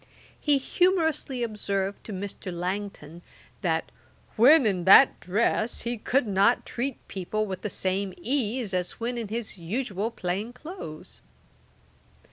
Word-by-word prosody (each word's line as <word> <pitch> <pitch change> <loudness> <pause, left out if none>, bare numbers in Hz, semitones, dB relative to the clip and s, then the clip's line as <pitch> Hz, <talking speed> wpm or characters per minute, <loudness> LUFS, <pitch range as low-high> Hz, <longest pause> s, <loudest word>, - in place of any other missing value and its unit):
He 295 -2 +3
humourously 320 -5 +1
observed 200 -3 -2
to - - -7
Mr. 195 -1 -5
Langton, 175 -2 -5 0.4
that 165 -4 -1 0.4
'when 265 +5 +7
in 185 -5 0
that 200 +8 +8
dress 215 +3 0
he 240 +1 -2
could 250 +4 +1
not 200 +3 +3
treat 255 +2 -4
people 210 +3 -2
with 190 -3 -5
the 210 - -3
same 190 0 -2
ease 235 -1 -1
as 180 -1 -2
when 240 +2 -2
in 230 -2 -4
his 220 -2 -5
usual 205 +3 -2
plain 205 +2 -3
clothes.' 275 - -9
210 Hz, 130 wpm, -27 LUFS, 190-245 Hz, 0.4 s, that